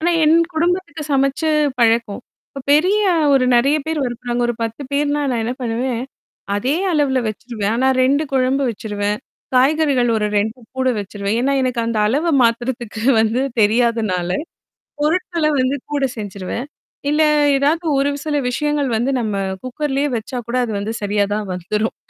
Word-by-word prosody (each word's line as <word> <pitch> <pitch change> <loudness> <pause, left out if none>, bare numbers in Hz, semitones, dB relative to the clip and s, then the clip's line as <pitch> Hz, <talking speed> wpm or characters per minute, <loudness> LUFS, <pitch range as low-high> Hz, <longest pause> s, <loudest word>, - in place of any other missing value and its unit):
ஆனா, 345 +2 +2
என் 310 +2 +5 0.2
குடும்பத்துக்கு 340 -2 -1
சமைச்சு 275 +3 +1 0.3
பழக்கம். 230 -1 +2 0.3
இப்ப 275 - -8
பெரிய 370 +8 +3 0.3
ஒரு 260 - +3
நிறைய 275 +5 +3
பேரு 320 -1 -1
இருக்குறாங்க 240 0 -3
ஒரு 240 - 0
10 230 +5 -4
பேர்ன்னா 290 +1 +1
நான் 235 -3 -1
என்ன 245 +3 -2
பண்ணுவேன், 240 +1 -2 0.5
அதே 260 +9 0 0.2
அளவுல 280 -4 +2
வச்சிருவேன். 215 -1 -3
ஆனா 260 +2 +2
2 275 +4 +3
குழம்பு 265 +1 +2
வச்சிருவேன், 205 -1 -3 0.4
காய்கறிகள் 270 -2 +3
ஒரு 210 - 0
2 220 +4 -2 0.2
கூட 260 0 +2
வச்சிருவேன். 200 +1 -3
ஏன்னா, 275 +2 +1
எனக்கு 250 -2 0
அந்த 230 -2 -1
அளவ 305 +8 +1
மாத்துறதுக்கு 235 -1 -1 0.2
வந்து 225 +3 +1 0.2
தெரியாதனால 215 -5 +1 0.7
பொருட்கள 335 +1 0 0.2
வந்து 255 +2 +1 0.2
கூட 280 -2 +1
செஞ்சிருவேன். 205 +4 -5 0.4
இல்ல, 300 +1 +2 0.4
ஏதாவது 315 +5 +1
ஒரு 275 +1 +2
சில 295 0 -2
விஷயங்கள் 295 +1 0
வந்து 240 +5 0
நம்ம 215 -4 -2 0.3
குக்கர்லே 275 +2 -2
வச்சா 230 +3 -4
கூட 245 +2 -1
அது 225 - -3
வந்து 210 +2 -3
சரியாதான் 205 0 0
வந்துரும். 210 +5 -2
250 Hz, 145 wpm, -19 LUFS, 220-285 Hz, 0.7 s, என்